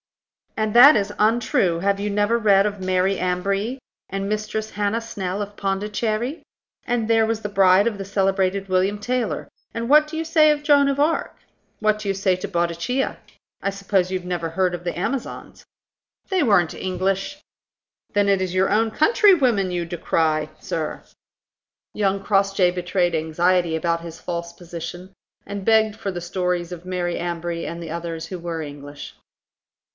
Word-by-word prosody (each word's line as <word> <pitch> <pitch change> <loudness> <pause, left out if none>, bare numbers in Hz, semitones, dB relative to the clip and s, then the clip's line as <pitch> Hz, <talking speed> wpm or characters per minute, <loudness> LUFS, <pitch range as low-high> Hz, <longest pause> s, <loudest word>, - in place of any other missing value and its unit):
"And 215 -1 0
that 250 +3 +9
is 205 0 -2
untrue. 210 -6 +2
Have 200 +2 +1
you 205 +1 -2
never 205 +3 +1
read 200 -3 +4
of 205 -2 -3
Mary 185 +1 +1
Ambree? 195 +6 -1 0.3
and 195 0 -3
Mistress 215 +1 -3
Hannah 205 +2 -1
Snell 200 -4 -4
of 205 0 -6
Pondicherry? 215 - -2 0.4
And 235 -2 -1
there 225 -1 +4
was 225 0 -2
the 210 - -3
bride 195 +1 +4
of 220 -3 -2
the - - -3
celebrated 195 0 0
William 190 +2 +1
Taylor. 245 +1 -2 0.3
And 230 0 -3
what 300 +1 +6
do 315 +1 -6
you 325 - -2
say 310 -2 +5
to 295 - -5
Joan 285 -1 +4
of 280 0 -1
Arc? 310 +3 0 0.4
What 215 0 +1
do 215 - -6
you - - +2
say 190 -1 +1
to 185 - -5
Boadicea? 175 +8 -1 0.4
I 195 - 0
suppose 195 -2 0
you 185 - -1
have 180 - -11
never 170 -2 -2
heard 180 +2 0
of 175 - -9
the 175 -1 -3
Amazons." 255 +8 -4 0.7
"They 375 -4 +2
weren't 200 - +3
English." 190 +8 -2 0.7
"Then 205 0 +2
it 195 -1 +3
is 185 -1 -2
your 190 +1 +3
own 225 +2 +3
countrywomen 275 - +3
you 175 -1 -2
decry, 160 -2 0
sir!" 160 -2 -4 0.9
Young 195 -1 0
Crossjay 195 -2 +2
betrayed 175 -1 0
anxiety 170 +2 +1
about 170 +1 -1
his 165 -1 -9
false 170 -1 -4
position, 175 +2 -8 0.3
and 200 -1 -6
begged 220 -1 +3
for 205 -3 -4
the 175 -1 -5
stories 180 0 -2
of 175 0 -8
Mary 180 -1 -2
Ambree 170 -1 -3
and 170 0 -6
the 165 - -7
others 165 -1 -5
who 180 +2 -7
were 170 -1 -4
English. 145 -1 -9
195 Hz, 170 wpm, -22 LUFS, 175-215 Hz, 0.9 s, that